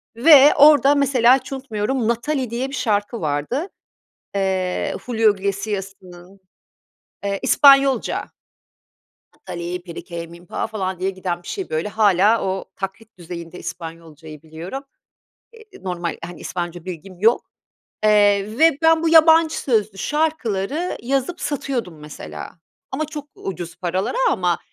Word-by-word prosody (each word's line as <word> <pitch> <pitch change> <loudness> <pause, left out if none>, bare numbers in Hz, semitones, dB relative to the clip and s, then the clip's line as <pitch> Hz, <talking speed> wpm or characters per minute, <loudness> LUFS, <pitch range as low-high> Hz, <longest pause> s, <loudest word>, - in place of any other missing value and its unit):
ve 285 +3 +7
orada 290 -1 +6
mesela 260 -3 +4
hiç 275 - -9
unutmuyorum 250 -2 -2
'Nathalie' 250 +2 -1
diye 250 +3 -3
bir 280 - -6
şarkı 210 -1 -1
vardı. 155 - -2 0.7
Eee, 190 -2 -1
Julio 225 -4 +3
Iglesias'ının, 195 -2 -5 0.8
eee, 200 -1 -2
İspanyolca. 275 -1 +4 1.1
"Nathalie 175 +1 -6
perike 170 -1 -7
minpa" 170 +4 -6
falan 190 -4 -4
diye 190 +1 0
giden 180 -2 -4
bir - - -13
şey 385 - -5
böyle. 160 +6 -1
Hâlâ 210 +1 +3
o 190 0 -2
taklit 200 +2 -7
düzeyinde 170 0 -8
İspanyolcayı 160 -2 -9
biliyorum. 165 - -7 0.7
Eee, 455 -1 -14 0.2
normal 175 -2 -4
hani 175 -1 -10
İspanyolca 175 -1 -5
bilgim 180 +1 -8
yok, 225 +3 +4 0.6
eee, 205 +1 +3
ve 320 -3 +5
ben 325 0 +4
bu 330 - +2
yabancı 320 0 +5
sözlü 215 -6 0
şarkıları 300 - -1
yazıp 275 +7 -1
satıyordum 245 - -3
mesela. 150 -1 -9 0.4
Ama 310 +4 -1
çok 295 -1 -7
ucuz 175 -3 -7
paralara 185 - -2
ama, 175 - 0
205 Hz, 125 wpm, -21 LUFS, 180-270 Hz, 1.1 s, ve